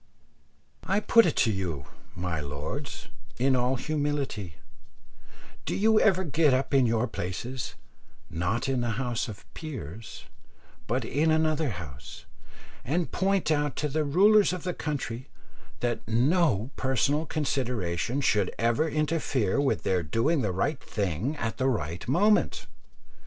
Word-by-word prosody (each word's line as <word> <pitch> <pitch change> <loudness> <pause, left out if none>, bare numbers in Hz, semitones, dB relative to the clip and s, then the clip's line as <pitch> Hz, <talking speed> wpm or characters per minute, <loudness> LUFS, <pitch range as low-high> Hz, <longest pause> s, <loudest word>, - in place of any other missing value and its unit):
I 195 - +1
put 230 0 +5
it 160 - 0
to 115 - +2
you, 85 -8 -3 0.3
my 90 -3 -2
lords, 75 - -5 0.3
in 130 +2 +3
all 125 +1 +2
humility, 140 - -2 1.1
do - - -2
you 220 +1 +4
ever 190 -3 +3
get 150 -4 +3
up 135 +2 -1
in 135 -3 +5
your 115 +1 +1
places, 115 +6 -5 0.5
not 90 +10 -1
in 130 -2 0
the 115 -2 -1
House 120 -3 -1
of 105 -3 -9
Peers, 115 - -7 0.6
but 120 +1 -1
in 150 +7 +1
another 155 -1 +2
House, 80 - -8 0.6
and 165 +6 -1
point 190 -3 +1
out 145 -2 +1
to 150 - -1
the 155 +2 0
rulers 195 +6 +5
of 180 - -5
the 180 -1 -2
country 130 -5 -4 0.5
that 120 -1 0
no 125 - +2
personal 140 +4 +1
consideration 125 - -1
should 105 -7 +2
ever 115 +8 +2
interfere 145 - 0
with 140 - 0
their 90 -1 +1
doing 115 - +1
the 105 -5 0
right 130 - -1
thing 100 - -2
at 115 -4 -3
the 135 0 +2
right 90 - -3
moment? 205 - +2
130 Hz, 140 wpm, -28 LUFS, 105-155 Hz, 1.1 s, put